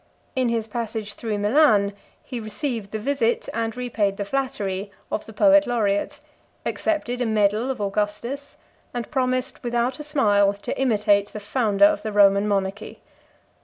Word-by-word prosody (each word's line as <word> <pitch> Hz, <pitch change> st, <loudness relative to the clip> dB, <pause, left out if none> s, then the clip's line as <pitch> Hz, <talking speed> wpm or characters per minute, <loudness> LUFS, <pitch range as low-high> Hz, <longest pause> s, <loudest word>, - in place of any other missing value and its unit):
In 255 Hz, -2 st, +1 dB
his 230 Hz, -2 st, 0 dB
passage 220 Hz, -2 st, -4 dB
through 220 Hz, -3 st, -3 dB
Milan 205 Hz, -2 st, +4 dB, 0.3 s
he 250 Hz, -3 st, -6 dB
received 220 Hz, -1 st, -4 dB
the 220 Hz, -, -2 dB
visit, 235 Hz, 0 st, 0 dB
and 225 Hz, +1 st, -2 dB
repaid 220 Hz, -5 st, -1 dB
the 200 Hz, -, -3 dB
flattery, 200 Hz, -5 st, -2 dB, 0.2 s
of 215 Hz, -, -3 dB
the -, -, -9 dB
poet 295 Hz, +6 st, +5 dB
laureate; 225 Hz, +3 st, 0 dB, 0.5 s
accepted 250 Hz, -6 st, -1 dB
a -, -, +1 dB
medal 215 Hz, +3 st, +2 dB
of 260 Hz, -3 st, -3 dB
Augustus; 210 Hz, +7 st, -3 dB, 0.4 s
and 240 Hz, -1 st, -4 dB
promised, 255 Hz, -2 st, -1 dB
without 240 Hz, +2 st, -1 dB
a -, -, -5 dB
smile, 205 Hz, -9 st, +3 dB
to 200 Hz, -, -5 dB
imitate 210 Hz, -5 st, +2 dB
the 215 Hz, -, -5 dB
founder 210 Hz, +3 st, +2 dB
of 310 Hz, 0 st, +3 dB
the 215 Hz, -, -4 dB
Roman 200 Hz, 0 st, +5 dB
monarchy. 195 Hz, 0 st, -2 dB
225 Hz, 155 wpm, -23 LUFS, 205-255 Hz, 0.5 s, poet